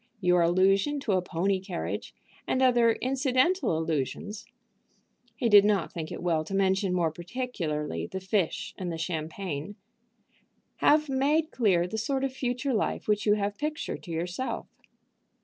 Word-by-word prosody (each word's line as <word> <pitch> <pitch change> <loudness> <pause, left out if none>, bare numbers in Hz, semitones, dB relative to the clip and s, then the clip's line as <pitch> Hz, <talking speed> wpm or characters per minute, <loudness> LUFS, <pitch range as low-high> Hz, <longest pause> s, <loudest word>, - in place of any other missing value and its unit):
Your 180 -2 +3
allusion 195 +11 +3
to 225 - -1
a 185 -1 +3
pony 185 +2 0
carriage, 185 -2 -5 0.3
and 260 - +1
other 240 -3 +5
incidental 260 - +1
allusions," 160 - -3 0.9
he 235 - 0
did 205 -2 +8
not 205 -4 +1
think 160 -2 -5
it - - -6
well 165 -3 +1
to 195 +5 -5
mention 190 0 +2
more 170 -3 +1
particularly 160 - -4
the 190 - -5
fish 190 -2 -1
and 180 -2 -3
the 165 - -4
champagne, 160 +1 -4 1.0
"have 305 +1 +4
made 290 +4 +1
clear 190 -8 +2
the 220 +5 -3
sort 270 +4 -1
of 270 -1 -1
future 255 +1 -2
life 215 - -1
which 210 0 +1
you 205 - +5
have 205 0 -2
pictured 300 +1 -3
to 175 - -9
yourself. 175 +10 -3
195 Hz, 150 wpm, -28 LUFS, 175-250 Hz, 1.0 s, did